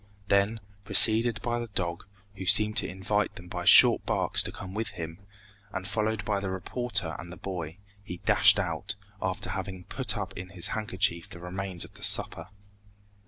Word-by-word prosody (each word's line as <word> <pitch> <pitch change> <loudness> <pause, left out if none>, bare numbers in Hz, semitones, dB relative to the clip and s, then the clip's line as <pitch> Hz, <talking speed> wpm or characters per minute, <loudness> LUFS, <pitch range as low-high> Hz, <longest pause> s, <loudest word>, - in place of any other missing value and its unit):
Then, 100 +3 +1 0.2
preceded 115 +3 +4
by 120 0 -2
the 120 - -5
dog, 90 -3 -4 0.3
who 95 -1 -7
seemed 105 +2 +5
to - - +4
invite 100 +3 -2
them 90 -3 -11
by - - -6
short - - +7
barks - - +2
to - - -2
come 95 -1 -9
with 110 +2 -3
him, 80 +1 -7 0.5
and 95 - -5
followed 110 +1 -2
by 100 - -1
the 100 -1 -4
reporter 95 -2 -2
and 85 - -9
the 90 - -10
boy, 85 -2 -6 0.3
he 90 -3 -8
dashed - - +5
out, 110 +1 -3 0.3
after 95 0 -3
having 95 -1 -6
put 125 +5 -2
up 95 -2 -6
in 90 +1 -8
his 90 -1 -8
handkerchief 100 -5 -1
the - - -11
remains 90 0 -5
of - - -17
the - - -13
supper. - - +4
95 Hz, 180 wpm, -27 LUFS, 90-105 Hz, 0.5 s, short